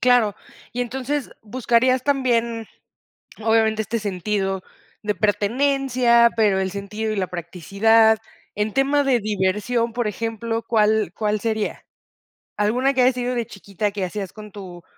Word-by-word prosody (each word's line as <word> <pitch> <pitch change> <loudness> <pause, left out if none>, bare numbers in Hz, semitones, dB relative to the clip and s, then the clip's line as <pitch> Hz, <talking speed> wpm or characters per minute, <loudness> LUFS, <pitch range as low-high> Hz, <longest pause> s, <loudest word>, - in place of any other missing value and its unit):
Claro, 245 -5 +4 0.4
y 245 - -3
entonces 265 +3 -3
buscarías 245 +2 +2
también, 235 -5 0 0.8
obviamente, 220 -1 +3
este 225 +3 -2
sentido 195 -1 -2 0.4
de 210 0 -1
pertenencia, 235 +4 +3
pero 210 -4 +3
el 190 0 -1
sentido 210 +3 -4
y - - -2
la 190 -2 -1
practicidad 200 +6 +2 0.4
en 210 0 -1
tema 280 +2 +2
de 265 -3 +2
diversión, 210 +3 0
por 240 -2 -1
ejemplo, 225 +1 -3
¿cuál 215 -4 +2
cuál 210 -1 -1
sería? 220 -1 -2 0.7
Alguna 245 +7 +2
que 255 - +3
haya 255 +1 +4
sido 250 0 -2
de 235 - -1
chiquita, 200 0 -4
que 200 -1 -4
hacías 190 +1 -4
con 210 -1 -11
tu 180 -4 -10
220 Hz, 140 wpm, -22 LUFS, 205-245 Hz, 0.8 s, Claro